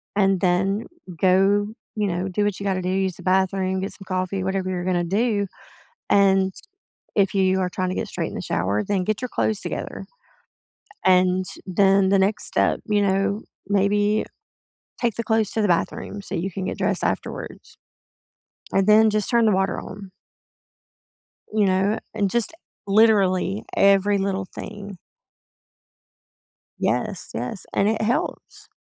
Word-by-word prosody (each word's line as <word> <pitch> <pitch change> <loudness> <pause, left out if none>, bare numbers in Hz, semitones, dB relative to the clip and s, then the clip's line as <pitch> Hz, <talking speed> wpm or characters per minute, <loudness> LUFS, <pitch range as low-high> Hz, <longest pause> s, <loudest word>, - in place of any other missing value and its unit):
and 195 -2 +3
then, 195 +4 +1 0.3
go 195 +2 +3 0.3
you 210 -1 0
know, 180 0 -2
do 195 +3 0
what 205 -2 -1
you - - -6
gotta 190 -2 0
do, 180 - -4
use 190 -1 0
the - - -11
bathroom, 190 0 +1
get 195 - -3
some 195 - -13
coffee, 185 0 -2
whatever 190 0 -1
you're 180 -1 -3
gonna 180 -1 +1
do, 205 +3 0 0.6
and, 195 -1 +4 0.6
if 200 -1 +2
you 190 -1 +3
are 185 -1 0
trying 185 0 -2
to 185 - -3
get - - -2
straight - - -3
in - - -10
the - - -4
shower, 100 +4 -1
then 195 -3 -1
get 215 +4 -2
your 250 - -3
clothes 215 -3 0
together. - - -5 1.0
And 185 0 +4 0.2
then, 195 +1 +3
the 195 - +4
next 195 +2 +1
step, - - +1
you 210 -2 +2
know, 200 +2 +1 0.3
maybe, 205 +1 +2 0.8
take 235 -4 +1
the 230 - -2
clothes 220 -2 +1
to 220 - 0
the 210 - +2
bathroom 180 +3 -1
so - - -5
you 190 +4 -2
can 190 +1 -4
get - - -4
dressed - - 0
afterwards. - - -5 1.0
And 195 0 +2
then, 215 +1 +6
just 210 -1 +1
turn 235 -2 +4
the 215 - +4
water 190 +1 0
on 195 0 -10 1.4
you 215 -1 +3
know. 195 +3 +2 0.2
and 205 -3 0
just, 235 +7 +1 0.3
literally, 200 -1 +3
every 200 +1 +4
little 195 -1 -1
thing. 205 -2 -8 1.8
Yes, - - -1
yes, 125 - -5
and 200 - +2
it 220 0 -1
helps. 230 +3 -3
195 Hz, 160 wpm, -23 LUFS, 185-205 Hz, 1.8 s, then